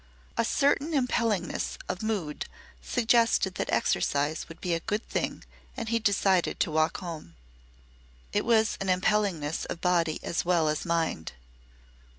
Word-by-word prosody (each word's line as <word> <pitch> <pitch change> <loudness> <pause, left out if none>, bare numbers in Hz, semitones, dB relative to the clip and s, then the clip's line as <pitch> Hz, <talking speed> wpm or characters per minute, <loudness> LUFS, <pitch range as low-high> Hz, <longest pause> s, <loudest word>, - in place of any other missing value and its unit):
A 230 - +2
certain 285 +5 +2
impellingness 230 - 0
of 185 - -3
mood 205 -9 -2 0.3
suggested 230 -5 +2
that - - -3
exercise 145 +4 +1
would 165 - -11
be 180 - -1
a 165 - +1
good 210 +6 -3
thing - - -2 0.3
and 225 -3 -3
he 230 0 +2
decided 195 -4 +2
to - - +1
walk 155 +1 +2
home. 160 - -7 1.0
It - - +2
was 225 -1 +2
an 195 - -2
impellingness 185 -5 +1
of 170 - -5
body 170 -3 +1
as 170 - -1
well 170 -3 +2
as 150 - -2
mind. 165 - -1
185 Hz, 145 wpm, -28 LUFS, 165-225 Hz, 1.0 s, A